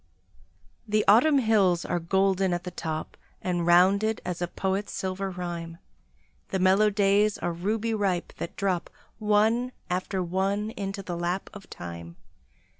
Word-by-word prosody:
The 215 0 +1
Autumn 265 +9 +6
hills 205 -8 +3
are 175 - -1
golden 190 +1 +1
at 175 - -5
the 180 - -6
top, 160 -2 -5 0.2
And 175 -2 -1
rounded 195 +5 +4
as 180 -1 -4
a 175 - 0
poet's 190 +3 -2
silver 190 +1 -3
rhyme; 170 -2 -5 0.7
The 190 - -1
mellow 190 +3 +4
days 205 +1 +2
are 175 - -2
ruby 215 +6 -1
ripe, 195 -5 -1
that - - -6
drop 185 -3 -1 0.3
One 220 +4 +2 0.2
after 185 +1 -1
one 195 +4 -1
into 195 -1 -5
the 175 -2 -4
lap 175 +2 -2
of 205 -2 -12
time. 85 -1 -8
190 Hz, 145 wpm, -27 LUFS, 175-210 Hz, 0.7 s, Autumn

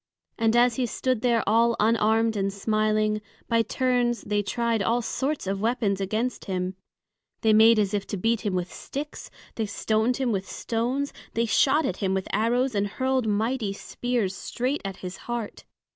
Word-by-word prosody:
And 225 0 +3
as 240 -1 +4
he 250 -2 +1
stood 255 0 -1
there 235 -2 +2
all 230 +3 +3
unarmed 225 +1 +3
and 195 -1 0
smiling, 215 +1 +1 0.3
by 230 -1 +3
turns 245 +1 0
they 205 0 0
tried 230 +2 0
all 230 +4 +1
sorts 270 +5 -2
of 195 +1 -2
weapons 220 -4 0
against 220 +6 -2
him; 185 -1 -2 0.7
they 220 -1 +4
made 220 +1 +7
as 205 -1 +1
if 205 -1 -1
to 200 - -3
beat 225 +4 +1
him 200 -3 -1
with 180 0 -3
sticks, 295 +2 -6 0.3
they 220 -2 -1
stoned 220 +4 0
him 260 -3 0
with 195 -2 -2
stones, 250 +5 -2 0.2
they 230 +1 +2
shot 275 +7 +3
at 185 - -2
him 190 -2 0
with 190 - -2
arrows 240 +5 +1
and 205 -1 +1
hurled 260 +2 0
mighty 215 0 0
spears 230 -2 -2
straight 255 +8 -2
at 195 -2 -5
his 180 +1 -6
heart. 240 -3 -5
225 Hz, 175 wpm, -26 LUFS, 205-245 Hz, 0.7 s, made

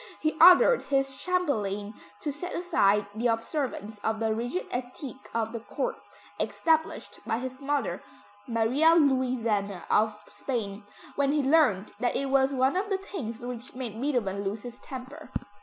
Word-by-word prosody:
He 310 0 0
ordered 365 +8 +8
his 270 -1 0
chamberlain 215 - -1 0.3
to 295 - -2
set 355 +6 -5
aside 210 - +3
the 230 +3 0
observance 230 -2 -2
of 220 +1 -1
the 220 -1 +1
rigid 245 +11 -2
etiquette 255 +2 -6
of 225 0 -1
the 230 - -3
Court, 485 - -3 0.4
established 320 -1 0
by 225 - -1
his 260 +2 -6
mother, 275 -10 -1 0.5
Maria 250 +8 +4
Louisa 240 - +1
of 215 0 +2
Spain, 205 -2 -4 0.3
when 280 -1 +2
he 295 -1 +1
learned 265 - +3
that 245 - 0
it 275 -1 -1
was 270 0 +4
one 260 +3 +2
of 395 +2 -1
the 390 - +1
things 265 - -6
which 245 0 -7
made 235 -3 -5
Beethoven 235 -9 0
lose 205 +2 -3
his 245 0 -8
temper. 260 +2 -9
250 Hz, 155 wpm, -28 LUFS, 220-285 Hz, 0.5 s, ordered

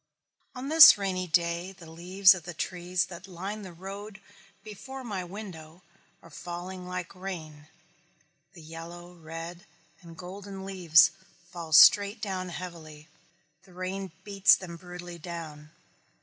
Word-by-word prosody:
On 255 +2 -6
this 320 -5 +10
rainy 185 -2 -2
day 170 +2 0
the 175 - -15
leaves 185 +4 +5
of 185 - -7
the 175 +1 -9
trees 180 +2 -2
that 180 0 -11
line 195 +4 -6
the 190 -3 -9
road 195 +4 -9 0.4
before 245 +6 -9
my 200 -6 -4
window 175 -3 -10 0.4
are 165 - -16
falling 180 +3 -7
like 180 -1 -5
rain, 160 -6 -8 0.9
the 170 -4 -14
yellow, 170 +2 -10
red, 165 +1 -9 0.4
and 165 -2 -13
golden 195 +1 -9
leaves 175 -4 +5 0.4
fall 170 -2 -8
straight 200 +7 +7
down 190 -3 -4
heavily. 160 -4 -9 0.5
The 185 - -20
rain 185 +1 -5
beats 200 -1 +5
them 175 -3 -8
brutally 175 0 -10
down. 155 -3 -8
180 Hz, 135 wpm, -28 LUFS, 170-195 Hz, 0.9 s, this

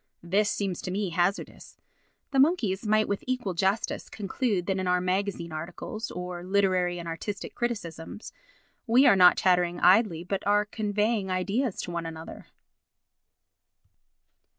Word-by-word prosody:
This 200 +5 +1
seems 195 -4 -2
to - - -5
me 195 +1 -1
hazardous. 175 +4 -2 0.5
The 270 - +1
monkeys 235 - +2
might 215 0 +3
with 200 - -2
equal 250 -7 -1
justice 195 +5 -1
conclude 205 -2 -2
that 190 0 -1
in 185 - -2
our 180 0 +3
magazine 185 -2 -2
articles, 175 +8 -6
or 180 -1 -6
literary 185 -2 +1
and 170 -1 -7
artistic 195 +5 -5
criticisms, 205 -6 -5 0.5
we 245 +4 +5
are - - +7
not 180 -1 +7
chattering 180 -2 +2
idly 185 -4 +4
but 195 +2 -3
are 205 0 +3
conveying 210 -1 -1
ideas 195 +6 -1
to 175 - -6
one 170 -1 -3
another. 160 0 -9
190 Hz, 140 wpm, -27 LUFS, 180-210 Hz, 0.5 s, are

